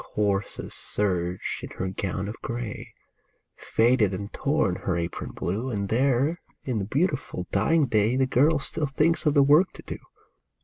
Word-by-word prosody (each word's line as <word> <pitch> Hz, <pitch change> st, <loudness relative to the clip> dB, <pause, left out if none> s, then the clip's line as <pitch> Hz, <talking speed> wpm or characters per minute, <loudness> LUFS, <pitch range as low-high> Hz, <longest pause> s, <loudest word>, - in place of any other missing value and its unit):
Coarsest 100 Hz, -1 st, -1 dB, 0.2 s
serge 90 Hz, -3 st, -1 dB
is -, -, -8 dB
her 95 Hz, -, -2 dB
gown 95 Hz, 0 st, -3 dB
of 105 Hz, -, -5 dB
gray, 120 Hz, -4 st, -5 dB, 0.6 s
Faded 115 Hz, -4 st, +2 dB
and 100 Hz, +2 st, -6 dB
torn 110 Hz, -, +1 dB
her 90 Hz, -2 st, -1 dB
apron 85 Hz, 0 st, -4 dB
blue, 105 Hz, +9 st, -3 dB
And 100 Hz, -4 st, -2 dB
there 135 Hz, +7 st, +2 dB, 0.2 s
in 125 Hz, -5 st, -1 dB
the 100 Hz, -, -2 dB
beautiful, 140 Hz, -, -1 dB
dying 150 Hz, +10 st, +3 dB
day 110 Hz, 0 st, +2 dB
The 130 Hz, 0 st, +3 dB
girl 145 Hz, +5 st, +3 dB
still 150 Hz, +2 st, -2 dB
thinks 155 Hz, +4 st, +1 dB
of 150 Hz, -, +3 dB
the 140 Hz, -, +7 dB
work 150 Hz, +7 st, +5 dB
to -, -, -12 dB
do. -, -, -6 dB
115 Hz, 165 wpm, -26 LUFS, 100-140 Hz, 0.6 s, the